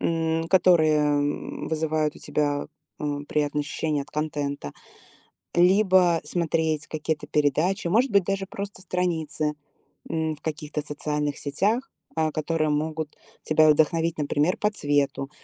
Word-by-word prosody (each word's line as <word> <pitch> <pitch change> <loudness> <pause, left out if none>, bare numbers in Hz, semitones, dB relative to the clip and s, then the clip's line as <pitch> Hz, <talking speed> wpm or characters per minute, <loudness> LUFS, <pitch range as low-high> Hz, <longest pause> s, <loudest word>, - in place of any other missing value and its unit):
М, 165 0 0
которые, 170 -5 +5
м, 145 -1 -1
вызывают 155 -1 0
у - - -12
тебя, 145 -1 -1 0.3
а, 145 -1 -2
приятные 150 0 0
ощущения 145 0 -2
от 150 - -15
контента. 145 - -3 0.8
Либо 180 -2 +5
смотреть 160 -3 0
какие-то 155 0 -3
передачи, 160 +6 +1
может 235 +8 +3
быть, 200 -2 +4
даже 195 0 -1
просто 200 -1 -7
страницы, 165 -5 -1 0.6
м, 160 -1 -1
в - - -23
каких-то 150 -1 -4
социальных 150 0 -2
сетях, 210 - 0 0.3
а, 160 -1 +1
которые 155 0 0
могут 155 +1 -2 0.3
тебя 155 0 +4
вдохновить, 160 +2 +2
например, 150 +3 +1
по 210 +1 +1
цвету. 140 -5 0
155 Hz, 130 wpm, -25 LUFS, 150-170 Hz, 0.8 s, которые